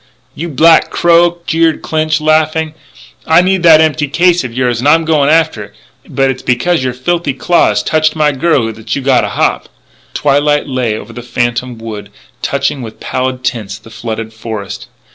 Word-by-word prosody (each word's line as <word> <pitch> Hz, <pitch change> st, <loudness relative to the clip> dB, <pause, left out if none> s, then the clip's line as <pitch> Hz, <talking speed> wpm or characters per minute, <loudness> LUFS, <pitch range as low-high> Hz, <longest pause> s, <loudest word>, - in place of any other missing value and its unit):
"You 170 Hz, +4 st, -5 dB
black 160 Hz, +3 st, +4 dB
crow!" 175 Hz, 0 st, +3 dB
jeered 165 Hz, -1 st, +1 dB
Clinch, 155 Hz, 0 st, 0 dB
laughing, 155 Hz, 0 st, +1 dB, 0.3 s
" -, -, -21 dB
I 160 Hz, +2 st, +5 dB
need 190 Hz, 0 st, +1 dB
that 160 Hz, -2 st, +6 dB
empty 155 Hz, -1 st, +1 dB
case 175 Hz, +4 st, +2 dB
of 125 Hz, -, -5 dB
yours. 125 Hz, -1 st, -1 dB
And 125 Hz, -, -1 dB
I'm 165 Hz, +1 st, +3 dB
going 150 Hz, -3 st, +2 dB
after 160 Hz, -9 st, +1 dB
it.... -, -, -21 dB, 0.3 s
But 135 Hz, -1 st, +1 dB
it's 130 Hz, -, -7 dB
because 130 Hz, +5 st, 0 dB
your 130 Hz, -1 st, -1 dB
filthy 150 Hz, +1 st, -2 dB
claw 170 Hz, -3 st, +2 dB
touched 155 Hz, +9 st, +1 dB
my 150 Hz, -1 st, +2 dB
girlie 135 Hz, -5 st, 0 dB
that 110 Hz, 0 st, -5 dB
you 140 Hz, -, -4 dB
gotta 130 Hz, -1 st, +2 dB
hop!" -, -, -1 dB, 0.5 s
Twilight 145 Hz, +1 st, +1 dB
lay 125 Hz, -5 st, -2 dB
over -, -, -10 dB
the 120 Hz, -, -8 dB
phantom 120 Hz, 0 st, -2 dB
wood, 105 Hz, -2 st, -8 dB, 0.3 s
touching 140 Hz, 0 st, -1 dB
with 110 Hz, -2 st, -9 dB
pallid 130 Hz, 0 st, -3 dB
tints 105 Hz, -5 st, -3 dB
the 115 Hz, +1 st, -16 dB
flooded 110 Hz, 0 st, -6 dB
forest. 110 Hz, -3 st, -7 dB
140 Hz, 180 wpm, -13 LUFS, 120-160 Hz, 0.5 s, that